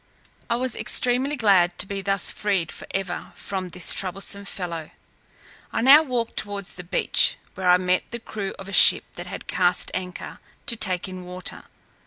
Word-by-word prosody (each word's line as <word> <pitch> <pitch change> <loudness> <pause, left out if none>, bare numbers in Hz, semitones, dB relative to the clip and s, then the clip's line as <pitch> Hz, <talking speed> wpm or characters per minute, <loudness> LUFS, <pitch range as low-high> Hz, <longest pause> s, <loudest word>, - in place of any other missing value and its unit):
I 235 - +2
was 255 0 -2
extremely 255 +4 +1
glad 190 -8 +3
to - - -2
be 200 0 -5
thus 195 0 0
freed 195 -6 -1
for - - -10
ever 195 -2 -4
from 190 -2 -5
this 180 0 +3
troublesome 195 +2 0
fellow. 170 -5 -5 0.8
I - - -1
now 275 +5 +8
walked 245 -6 -3
towards 200 -2 -2
the 180 - -9
beach, 180 +1 +3 0.2
where 185 -1 -1
I 180 - +7
met 180 0 0
the 235 - -4
crew 210 -4 -6
of 195 - -10
a 195 - -8
ship - - +6
that 175 +1 -8
had 195 - -7
cast 180 -1 +2
anchor, 180 -1 -6 0.3
to 235 - +2
take 185 -4 -1
in 185 -1 -8
water. 180 +1 -6
195 Hz, 180 wpm, -24 LUFS, 180-215 Hz, 0.8 s, now